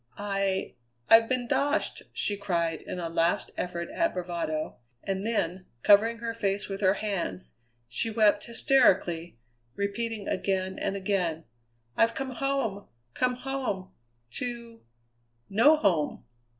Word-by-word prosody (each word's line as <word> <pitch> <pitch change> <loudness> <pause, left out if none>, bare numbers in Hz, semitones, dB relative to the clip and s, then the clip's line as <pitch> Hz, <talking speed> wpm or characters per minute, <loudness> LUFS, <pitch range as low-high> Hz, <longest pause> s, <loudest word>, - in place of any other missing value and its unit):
"I 195 -1 -1 0.4
I've 225 0 +8
been 255 -2 0
doshed!" 290 +5 0
she 205 - -1
cried 170 -5 -1
in - - -6
a 170 -2 -3
last 165 +1 +1
effort 170 -1 -3
at 335 -1 0
bravado, 170 -3 -3 0.3
and 195 0 -2
then, 190 -5 -1 0.2
covering 220 +3 +6
her 230 0 -4
face 200 -2 -1
with 195 0 -5
her 190 0 +4
hands, 170 - -3 0.3
she 120 - -2
wept 210 -2 +3
hysterically, 190 - +2 0.4
repeating 210 +1 -3
again 190 -1 -1
and 200 - -1
again, 185 -5 -1 0.5
"I've 230 0 +3
come 270 -1 -3
home, 250 -6 -1 0.3
come 250 0 +1
home 250 -8 -3 0.4
to 235 - -5 0.7
no 275 +10 +6
home!" 175 - +1
200 Hz, 125 wpm, -28 LUFS, 180-230 Hz, 0.7 s, I've